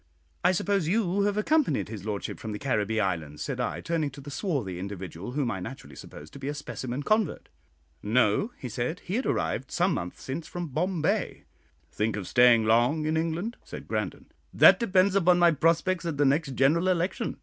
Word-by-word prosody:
"I 180 - +5
suppose 195 -2 0
you 200 0 +1
have 205 0 0
accompanied 305 +7 +1
his 105 -3 -7
lordship 105 -2 -4
from 110 -1 -5
the - - -4
Caribbee 110 -4 0
Islands," 80 -7 -2
said - - -4
I, - - -2
turning 165 -3 -1
to 140 +1 -12
the 145 +1 -9
swarthy 135 - -2
individual, 95 +1 -6
whom 135 -4 0
I 95 - -4
naturally 115 +9 -9
supposed 75 +2 -11
to - - -10
be 135 - -5
a 145 - -2
specimen 130 -2 -5
convert. 215 -4 0 0.5
"No," 110 - +2
he 130 - -6
said; 125 +8 -3
"he 180 - -6
had 255 +5 0
arrived - - -1
some - - +1
months 90 +1 -5
since 150 +5 -5
from 175 -2 -5
Bombay." 165 +3 -1 0.5
"Think 110 0 -1
of 100 -4 -5
staying 120 -2 +5
long 120 +8 +3
in 155 +1 0
England?" 165 +8 -2
said - - -9
Grandon. - - -3 0.3
"That - - +7
depends 190 -4 +3
upon 180 -2 +4
my 175 -1 +5
prospects 165 +4 +1
at 155 -4 -3
the 145 - +3
next 140 0 +1
general 155 +8 +3
election. 180 +1 -1
145 Hz, 195 wpm, -27 LUFS, 110-180 Hz, 0.5 s, That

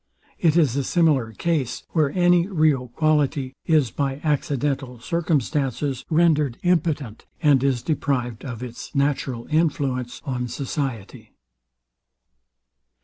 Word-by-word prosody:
It 165 -2 +3
is 145 -8 +3
a 140 - 0
similar 145 -7 +2
case, 135 0 -2
where 155 -4 +2
any 175 -1 +4
real 155 -9 +2
quality 145 -1 0
is, 150 -8 +3
by 140 -1 -2
accidental 140 -4 -1
circumstances, 145 -3 -1
rendered 155 -6 +2
impotent, 155 -10 0
and 145 -5 +4
is 130 -4 +1
deprived 125 -7 -1
of 125 -3 -6
its 120 +2 -8
natural 140 -4 0
influence 140 -6 0
on 125 -2 -2
society. 120 - -5
140 Hz, 110 wpm, -23 LUFS, 125-155 Hz, -, any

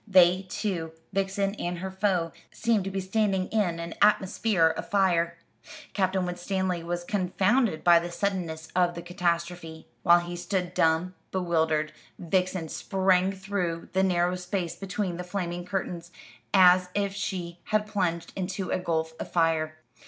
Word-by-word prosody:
They 185 -1 +5
two 180 -6 -3 0.2
Vixen 195 0 0
and 175 0 -2
her 190 +2 -5
foe 190 -4 0 0.2
seemed 225 -4 +1
to - - -2
be 195 0 -3
standing 190 -1 0
in 185 -7 0
an 170 0 -5
atmosphere 200 -3 +3
of - - -6
fire. 170 -4 +2 0.6
Captain 190 -2 +1
Winstanley 180 0 -2
was 175 +1 -3
confounded 190 +1 +1
by 175 -1 +7
the 170 +1 -5
suddenness 170 -4 -2
of 175 -1 +2
the 170 - -6
catastrophe. 170 -2 -2 0.2
While 175 -1 +6
he 175 0 -6
stood 180 0 -2
dumb, 165 +2 +2 0.2
bewildered, 160 -4 +1 0.2
Vixen 180 -1 0
sprang 190 0 +2
through 190 -4 -3
the 190 - +3
narrow 180 -1 +2
space 180 -1 -3
between 195 -2 -3
the 180 - -4
flaming 175 -1 -4
curtains, 180 -2 -4 0.4
as 180 -1 +6
if 200 -1 0
she 180 -3 -4
had 215 0 +1
plunged 180 -5 -2
into 190 0 -3
a - - +1
gulf 160 -2 -1
of - - -6
fire. 160 -2 +1
180 Hz, 150 wpm, -27 LUFS, 170-195 Hz, 0.6 s, by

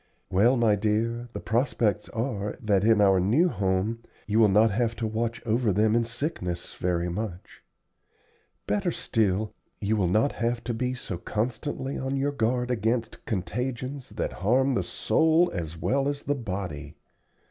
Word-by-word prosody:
"Well, 115 +8 +4
my 115 -3 +4
dear, 115 +3 -1
the - - -4
prospects 115 -2 0
are 110 -4 -3
that 105 -5 +2
in 110 -1 +5
our 95 -2 +5
new 125 - +3
home 100 - 0 0.3
you 110 +1 +1
will 110 - +7
not 105 +3 +5
have 115 +2 0
to 115 - -3
watch 115 +2 -2
over 115 0 +2
them 105 +3 +3
in 120 - +3
sickness 115 - -4
very 90 -1 -1
much. 90 0 -5 1.0
Better 200 -3 0
still, 110 - 0 0.3
you 105 +1 0
will 95 -4 +2
not 110 +9 +3
have 120 0 -2
to 120 - -2
be 125 +2 -1
so 95 -8 -6
constantly 130 - -3
on 135 +1 -2
your 140 +1 +1
guard 125 -1 0
against 115 0 -1
contagions 125 +6 -3
that - - -3
harm 130 +7 +3
the - - +1
soul 160 +2 +2
as 85 -2 -4
well 135 +10 +1
as 145 0 -3
the 145 - 0
body. 90 - -5
115 Hz, 160 wpm, -27 LUFS, 100-125 Hz, 1.0 s, will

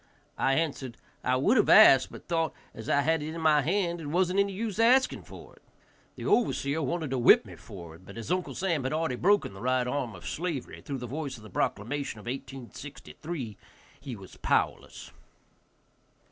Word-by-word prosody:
I 135 - +3
answered, 140 -6 -2 0.3
"I 125 - +2
would 140 - +3
have 215 - +3
asked, 135 -12 +8
but - - -12
thought, 165 -2 0 0.2
as 110 - -8
I 140 - +4
had 160 +2 +1
it 155 +2 -5
in 165 - -5
hand, 170 +3 +2
it 150 - -6
wasn't 180 +4 +1
any 200 0 +2
use 210 +1 -4
asking 255 +3 +4
for - - -12
it." - - -24 0.5
The - - -7
overseer 160 -10 +1
wanted 160 0 -2
to 130 - 0
whip 120 - +6
me - - -11
for 85 -4 -11
it, 85 - -16
but 100 +3 -12
as 115 +8 -5
Uncle 180 0 -1
Sam 170 -7 0
had 130 - -2
already 160 -4 0
broken 195 - +2
the 95 - -11
right 130 0 +1
arm 125 -4 -2
of 90 -4 -12
slavery, 160 - -4
through 140 - -5
the 125 - -6
voice 140 +1 -5
of 110 - -15
the 105 - -12
proclamation 115 +6 -2
of 105 - -13
1863, 135 - -7 0.4
he 130 -2 -7
was 95 -3 -13
powerless. - - -1
145 Hz, 190 wpm, -28 LUFS, 125-170 Hz, 0.5 s, asked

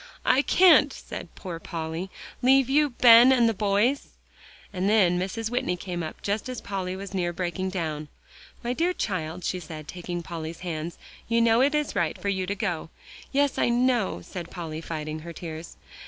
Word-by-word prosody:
"I 255 +2 +5
can't," 320 -3 +6
said - - -8
poor 175 -4 -6
Polly, 165 +2 -5 0.3
"leave 265 +1 +4
you, 295 +1 +4
Ben, 240 0 +8
and 240 -3 +5
the 225 - +2
boys." 210 +7 +1 0.7
And 190 +1 0
then 185 -5 +4
Mrs. 220 +5 -3
Whitney 245 -8 -1
came 175 -1 -4
up 155 -1 -7
just 205 +4 -2
as 255 - -4
Polly 185 -2 -4
was 195 0 -7
near 175 -2 0
breaking 180 +2 -3
down. 155 -5 -3 0.6
"My 240 +1 -1
dear 340 +7 +1
child," 180 - -3
she 185 - -1
said, 155 -3 -9
taking 175 0 -5
Polly's 165 -1 -6
hands, 170 -1 -4 0.3
"you 230 0 +2
know 230 +1 +4
it 285 +3 +3
is 300 -1 -1
right 170 -5 0
for 200 - -2
you 190 -2 -1
to 200 - -1
go." 175 -6 -3 0.4
"Yes, 285 0 +1
I - - +3
know," 240 -3 +1
said 175 -3 -7
Polly, 160 -3 -6
fighting 155 -1 -5
her 170 +2 -8
tears. 160 0 -8
190 Hz, 185 wpm, -26 LUFS, 170-235 Hz, 0.7 s, Ben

